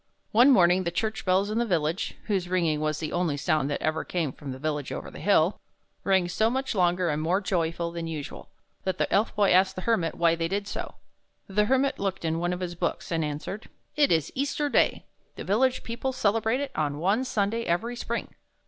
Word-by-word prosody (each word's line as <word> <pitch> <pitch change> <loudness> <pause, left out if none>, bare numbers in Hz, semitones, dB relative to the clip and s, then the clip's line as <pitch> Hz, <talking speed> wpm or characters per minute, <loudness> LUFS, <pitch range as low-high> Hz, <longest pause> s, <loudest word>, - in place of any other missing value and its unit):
One 240 +5 +6
morning 185 -6 +5
the 170 - 0
church 220 +4 -2
bells 190 +2 +2
in 220 - 0
the - - +3
village 170 0 -1
— - - -33
whose 190 -4 -1
ringing 170 -4 +1
was 155 0 0
the 155 -1 -4
only 175 -5 0
sound 150 -1 +1
that 145 - -3
ever 155 +1 0
came 165 -6 -2
from 140 +1 -8
the 130 - -6
village 150 0 -3
over - - -6
the - - -10
hill 195 -2 +3 0.2
— - - -45
rang 190 -2 +3
so 220 +5 +1
much 265 +2 -2
longer 180 -2 +2
and 150 +1 -1
more 175 +5 +1
joyfully 170 -3 -1
than 165 - -4
usual, 155 -3 -7 0.3
that 190 -1 -1
the - - -1
Elf 215 +3 +2
Boy 205 -2 +3
asked 190 +1 +4
the 185 - -5
Hermit 180 -8 +1
why 170 -1 +3
they 165 0 -1
did 200 +3 -2
so. - - -5 0.5
The 210 +2 +1
Hermit 265 +4 +1
looked 190 -3 -2
in 160 0 0
one 175 +1 0
of 180 +1 -3
his 175 -1 -3
books, 175 - -3
and 165 -1 +1
answered: 150 +8 -5 0.3
"It 295 -2 +3
is 160 -3 +2
Easter 285 +2 -1
Day. - - +2 0.3
The - - -6
village 250 +6 +1
people 245 +3 -3
celebrate 225 +1 +1
it 280 -1 -4
on 145 -2 -1
one 195 - +1
Sunday 225 -2 0
every 225 +8 -1
spring." 235 -1 -4
185 Hz, 220 wpm, -27 LUFS, 165-220 Hz, 0.5 s, One